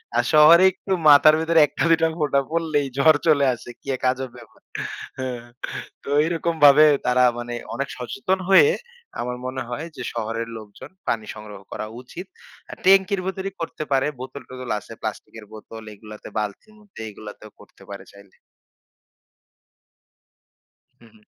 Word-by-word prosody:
আর - - +3
শহরে 160 +4 +8
একটু 190 +1 -9 0.2
মাথার 150 +2 +7
ভেতরে 165 0 +2
১ - - -12
টা, - - +1
২ 165 - +5
টা 165 - +4
ফোটা 140 -2 +2
পড়লেই 155 -4 0
জ্বর 155 +2 +5
চলে 140 -3 +4
আসে। 120 - -10
কি - - -22
এক - - -22
আজব 130 0 -5
ব্যাপার! 120 - -17 0.6
হ্যা, 130 -1 -3 0.7
তো - - -8
এইরকমভাবে 160 -3 +5 0.2
তারা 125 0 +3
মানে 120 0 -5 0.2
অনেক 140 0 -3
সচেতন 190 - -2
হয়ে 315 - +7 0.5
আমার 125 0 -3
মনে 130 +1 -4
হয় 145 +7 -5
যে - - -7
শহরের 115 0 -3
লোকজন 110 +5 -12 0.2
পানি 110 -2 -1
সংগ্রহ 105 -2 -10
করা - - -5 0.2
উচিত। 170 +8 -10 0.4
আর - - -9
ট্যাংকির 190 0 +4
ভেতরেই 190 0 -4
করতে 165 -1 -4
পারে। 135 +1 +2
বোতল-টোতল 130 -1 -9
আছে, 115 - -16
প্লাস্টিকের 110 0 -7
বোতল 110 +1 -11
এগুলাতে 105 +1 -12
বালতির 105 - -5
মধ্যে 205 - -13
এগুলাতেও 105 +1 -12
করতে - - -18
পারে 100 -1 -9
চাইলে। 100 -1 -18 2.6
হু, 120 - -18
হু। 105 -1 -23
135 Hz, 150 wpm, -22 LUFS, 115-165 Hz, 2.6 s, শহরে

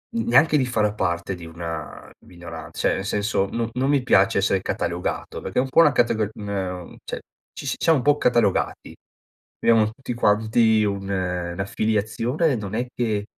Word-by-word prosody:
n 230 - 0
neanche 160 -9 +5
di 130 - +2
far 105 -4 0
parte 85 +1 -1
di 85 -1 -10
una 80 -2 -7 0.2
minoran 85 -2 -10
cioè - - 0
nel 95 - -4
senso, 105 -1 0
no 115 -1 -2
non 130 +2 0
mi 140 - +3
piace 125 - +4
essere - - +1
catalogato 85 +1 -3
perché - - -2
è - - +5
un 135 - -3
po' 165 - +5
una 150 - +6
categori 110 -4 +1
ne 100 -2 -3
un 90 -1 -8
cioè - - -5 0.4
ci - - -7
siamo 160 -4 +3
un - - -5
po' 145 +2 +4
catalogati, 120 -7 +1 0.6
abbiamo 115 -2 +4
tutti 125 +1 -6
quanti 110 0 +3
un 100 -1 -2
un'affiliazione, 100 - -1
non 105 -1 -5
è 120 +2 -1
che 110 -4 -1
105 Hz, 175 wpm, -23 LUFS, 95-120 Hz, 0.6 s, una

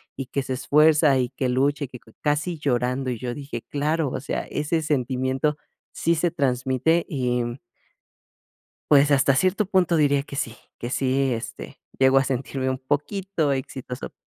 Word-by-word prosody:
y 135 -1 -5
que 140 - -1
se 130 - -3
esfuerza, 150 +1 +4
y 125 -1 0
que 130 0 -2
lucha, 140 +4 +1
y - - -10
que 125 - -10
cue 110 - -21
casi 150 +4 0
llorando. 130 -1 0
Y 120 - -4
yo 125 0 -3
dije: 140 0 -6
"Claro, 150 +1 0
o - - -3
sea, 140 - -3
ese 160 +2 -1
sentimiento 130 0 0 0.4
sí 170 +1 +1
se 165 +1 +1
transmite", 130 +3 +1
y 125 -4 0 1.5
pues, 145 0 +6
hasta 140 -1 +4
cierto 185 +7 +2
punto 180 -3 +2
diría 145 -2 +3
que 140 0 -9
sí, 115 -4 -2 0.2
que 120 - -5
sí, 135 0 +1
este, 115 -1 -6 0.2
llego 130 0 +5
a 135 - +1
sentirme 130 0 -2
un 130 - -1
poquito 150 +4 -1
exitoso. 130 -1 -5
140 Hz, 170 wpm, -24 LUFS, 130-150 Hz, 1.5 s, pues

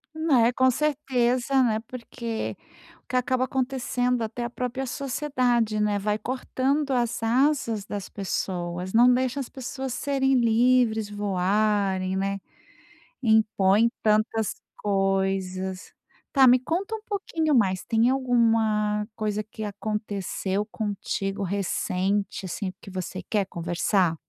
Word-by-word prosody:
Né, 270 -7 +3
com 260 0 +4
certeza, 265 -2 +1
né, 220 -4 +2
porque 235 -2 -5 0.5
o - - -47
que - - -4
acaba 255 0 +1
acontecendo, 250 -2 -1
até 225 +2 -4
a 240 - -2
própria 250 +2 -3
sociedade, 250 -5 0
né, 210 -1 +1
vai 210 +1 0
cortando 265 +4 -1
as 240 -2 0
asas 230 -3 +1
das 200 -2 -5
pessoas, 180 -2 -3
não 245 +2 +6
deixa 260 +2 0
as 265 - -3
pessoas 265 -1 -5
serem 270 -1 +1
livres, 235 -2 +3
voarem, 200 -1 0
né, 195 +1 -1 0.8
impõem 220 -1 +4
tantas 215 0 +2 0.2
coisas. 195 -1 -1 0.4
Tá, 265 -2 +6
me 250 +1 +7
conta 360 - -2
um 440 - -8
pouquinho 330 -7 -1
mais, 190 -6 +2
tem 230 +1 +2
alguma 225 -5 +2
coisa 215 -1 -2
que 215 +1 -8
aconteceu 205 -1 -3
contigo 205 -2 -3
recente, 195 +1 -1
assim, 185 +1 -3
que - - -12
você 185 0 -5
quer 205 -3 +1
conversar? 175 +1 0
225 Hz, 120 wpm, -26 LUFS, 200-255 Hz, 0.8 s, me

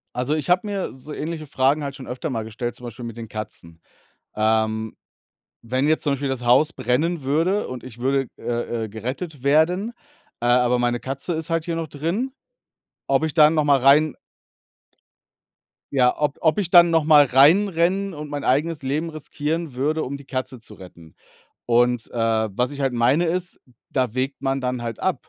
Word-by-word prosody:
Also, 125 +4 -1
ich 155 +2 -4
habe 180 +4 +3
mir 200 -2 -3
so 135 +4 -10
ähnliche 155 0 -5
Fragen 135 +3 +1
halt 140 -1 -5
schon 135 -3 -10
öfter 125 +6 -4
mal 115 -5 -3
gestellt, 115 +2 -5
zum - - -15
Beispiel 120 +1 -8
mit 115 -2 -7
den 115 -2 -8
Katzen. 85 -6 -8 0.6
Ähm, 110 0 0 0.7
wenn 130 +4 0
jetzt 155 +1 +1
zum 145 -2 +1
Beispiel 140 0 -2
das 130 -2 -3
Haus 135 +6 +4
brennen 155 +8 0
würde 165 +9 0
und 125 -1 -7
ich 120 -2 -11
würde, 135 +1 0
äh, 120 -1 -3
äh, - - -9
gerettet 130 - -6
werden, 165 +9 +2 0.5
äh, - - -4
aber 125 0 +3
meine 120 0 0
Katze 135 +7 -4
ist 160 0 -4
halt 165 -1 0
hier 170 - -2
noch 165 -1 -3
drin, 170 - -2 0.8
ob 135 +3 +2
ich 160 - -1
da 150 -1 +7
noch 155 -1 +1
mal 140 -1 +4
rein 140 +3 +5 1.8
ja, 125 -2 +4
ob 150 -1 -1
ob 160 -2 +2
ich 195 -5 -1
dann 175 -1 +7
noch 165 -1 +3
mal 150 -1 +7
reinrennen 175 +7 +3
und 150 -1 -7
mein 145 -2 -4
eigenes 150 +4 +1
Leben 145 +5 -2
riskieren 155 0 -4
würde, 150 +5 0
um 140 - -4
die 140 - -10
Katze 130 -2 -5
zu - - -13
retten. 85 -4 -14 0.5
Und, 120 0 +2
äh, 120 - -6 0.3
was 125 +7 -1
ich 145 - -7
halt 135 -2 +1
meine, 125 +8 +2
ist, 175 +1 -2
hm, 125 - -27 0.2
da 130 -4 0
wägt 130 +3 -3
man 135 0 0
dann 125 -1 -2
halt 115 -2 -5
ab. - - -2
140 Hz, 190 wpm, -22 LUFS, 125-160 Hz, 1.8 s, da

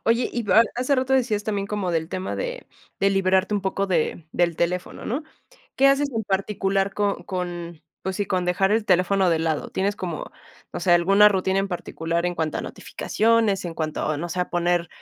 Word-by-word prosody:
Oye, 230 +2 +2
y 240 -1 -2 0.3
hace 255 +3 +1
rato 260 0 0
decías 230 -6 +1
también, 200 -2 -2
como 205 -3 -2
del 160 -1 -1
tema 185 +1 -4
de - - -4 0.3
de 195 - +4
liberarte 190 +1 +2
un 205 - 0
poco 195 +1 -1
de 170 -2 -1
del 170 -2 +1
teléfono, 180 +1 -2
¿no? 265 +8 -2 0.5
¿Qué 275 - +6
haces 280 +1 +2
en 225 - 0
particular 195 0 0
con 200 -4 -1
con, 175 -3 -5 0.2
pues 190 0 -3
sí, 205 - -1
con 185 -1 0
dejar 185 +2 +1
el 220 0 +2
teléfono 185 0 +3
de 165 - +2
lado? 160 -2 -1
¿Tienes 200 +2 -1
como, 175 -6 -5 0.4
no - - -4
sé, 175 - +3
alguna 195 +4 +6
rutina 190 -1 0
en 195 0 0
particular 170 -1 -3
en 175 - -1
cuanto 160 -2 -2
a - - -2
notificaciones, 220 -3 0
en 170 -2 -5
cuanto 155 -2 -3
a, 155 - 0
no 175 - -4
sé, 180 +2 -2
a 180 - -2
poner, 175 -1 +1
190 Hz, 205 wpm, -24 LUFS, 175-210 Hz, 0.5 s, Qué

